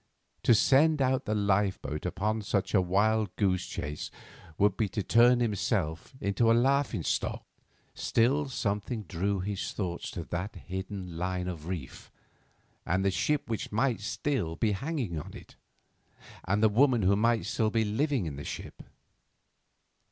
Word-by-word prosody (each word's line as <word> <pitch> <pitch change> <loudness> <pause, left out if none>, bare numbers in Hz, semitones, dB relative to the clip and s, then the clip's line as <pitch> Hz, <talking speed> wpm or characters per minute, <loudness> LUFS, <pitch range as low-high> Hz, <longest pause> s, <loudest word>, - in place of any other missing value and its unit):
To 120 - +5
send 150 +7 +4
out 130 -1 +1
the 105 - -1
lifeboat 95 -6 0
upon 105 +5 -1
such 100 -1 -1
a 100 - +5
wild 105 +2 +1
goose 95 -3 +1
chase 75 0 -5 0.5
would 100 -1 +3
be 105 -1 0
to 100 +2 -3
turn 120 +3 +5
himself 100 - -1
into 105 +3 +2
a 115 - +5
laughing 130 - +2
stock. - - -2 0.5
Still 135 +5 +1
something 105 -1 -2
drew 95 +1 -1
his 100 +1 -3
thoughts 90 -4 -3
to 85 - -5
that 90 +6 -4
hidden 95 -2 -6
line 90 0 -2
of 85 -3 -6
reef, 85 -8 -6 0.7
and 95 +3 0
the 100 - +3
ship 150 +9 0
which 115 -2 -3
might 115 +3 +1
still 105 - -2
be 105 +5 +1
hanging 115 - -2
on - - -9
it, - - -13 0.9
and 105 +3 +1
the - - +8
woman 120 0 +3
who 95 +2 +4
might 115 +2 +2
still 110 -1 0
be 110 0 +1
living 130 - 0
in 75 -4 -5
the 70 - -6
ship. - - -7
105 Hz, 155 wpm, -29 LUFS, 90-115 Hz, 0.9 s, the